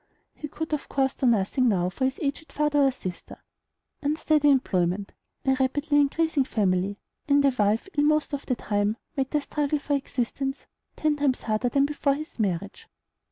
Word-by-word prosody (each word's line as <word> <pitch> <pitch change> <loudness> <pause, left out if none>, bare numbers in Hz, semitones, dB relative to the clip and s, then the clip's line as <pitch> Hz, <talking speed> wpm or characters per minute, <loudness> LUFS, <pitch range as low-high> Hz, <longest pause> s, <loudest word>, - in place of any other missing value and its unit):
He 300 - -7
could 315 +1 -5
of 300 - -3
course 270 -1 +1
do 260 - 0
nothing 235 +3 +2
now 180 -4 +1
for 260 - -1
his 265 +1 -1
aged 285 +3 -3
father 295 -1 +1
or 270 -1 +4
sister. 185 -8 -8 0.6
Unsteady 300 0 +2
employment, 195 -7 +1 0.3
a 265 - +4
rapidly 290 +3 +2
increasing 290 0 +2
family, 200 -4 0 0.3
and 285 -1 +4
a 275 - +4
wife 210 - +2
ill 290 0 +3
most 305 0 +2
of 285 - -4
the 255 - +1
time, 205 0 -1 0.2
made 270 -2 -1
the 300 - 0
struggle 295 +1 -1
for 290 0 -3
existence 270 0 -2 0.3
ten 305 -1 +1
times 280 -3 0
harder 220 +3 0
than 275 +3 +3
before 285 -1 0
his 305 -2 -9
marriage. 200 -1 -2
270 Hz, 175 wpm, -26 LUFS, 215-290 Hz, 0.6 s, or